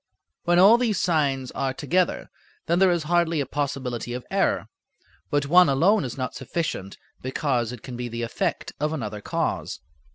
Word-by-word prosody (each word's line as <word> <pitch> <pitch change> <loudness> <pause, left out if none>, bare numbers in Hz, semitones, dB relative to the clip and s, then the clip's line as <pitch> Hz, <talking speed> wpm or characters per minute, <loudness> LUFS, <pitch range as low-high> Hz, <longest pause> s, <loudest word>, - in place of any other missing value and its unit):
When 175 0 +3
all 205 +6 +7
these 225 -6 +1
signs 140 -6 0
are 135 -1 -2
together 180 +4 0 0.3
then 170 +2 +1
there 190 -1 +5
is 175 -2 +1
hardly 170 0 +1
a 140 - 0
possibility 130 -4 -3
of 125 0 -6
error, - - +1 0.6
but 145 -1 +1
one 175 +2 +6
alone 175 +10 +3
is 125 -1 -5
not 130 -2 -3
sufficient, 125 - -4 0.2
because 130 -3 -1
it 125 -3 -9
can 125 - -7
be 120 0 -4
the 120 0 -4
effect 155 +7 -2
of 150 +1 0
another 105 -8 -4
cause. - - -2
145 Hz, 170 wpm, -25 LUFS, 125-170 Hz, 0.6 s, all